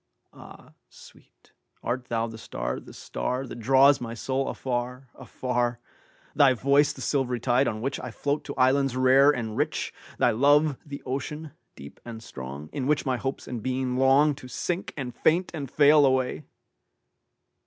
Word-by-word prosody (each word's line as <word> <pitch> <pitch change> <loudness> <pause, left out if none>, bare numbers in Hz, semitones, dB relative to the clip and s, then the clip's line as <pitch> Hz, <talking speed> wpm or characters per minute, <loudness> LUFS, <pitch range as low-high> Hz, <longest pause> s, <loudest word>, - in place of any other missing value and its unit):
Ah, - - -14 0.2
sweet, - - -19 0.3
art 125 +1 -2
thou 115 -2 -1
the 115 -1 -8
star, - - -4
the - - -14
starThat 125 -1 -4
draws 135 +4 +5
my 115 -1 -5
soul 135 +4 -2
afar, 125 0 -4
afar? 120 -1 -2 0.5
Thy 135 -2 +5
voice 140 +4 +3
the - - -10
silvery 125 -4 0
tide 125 +3 +2
on 110 -1 -3
whichI 130 -2 -3
float 145 +5 -2
to 140 - -6
islands 135 0 +2
rare 130 +2 +6
and 115 -6 -1
rich? - - -2 0.2
Thy - - +3
love 145 +4 +3
the 140 -1 -9
ocean, 145 +4 -4 0.2
deep 70 +1 -12
and 115 -1 -9
strong, 70 0 -8
In 135 -2 -2
which 150 0 +1
my 130 -2 0
hopes 135 +2 -4
and 120 -3 -5
being 130 0 -2
longTo 135 +1 +3
sink 175 +8 -3
and 125 -3 -5
faint 170 +8 +1
and 140 -5 -5
fail 150 +1 +5
away? 130 -2 +1
130 Hz, 155 wpm, -26 LUFS, 120-140 Hz, 0.5 s, rare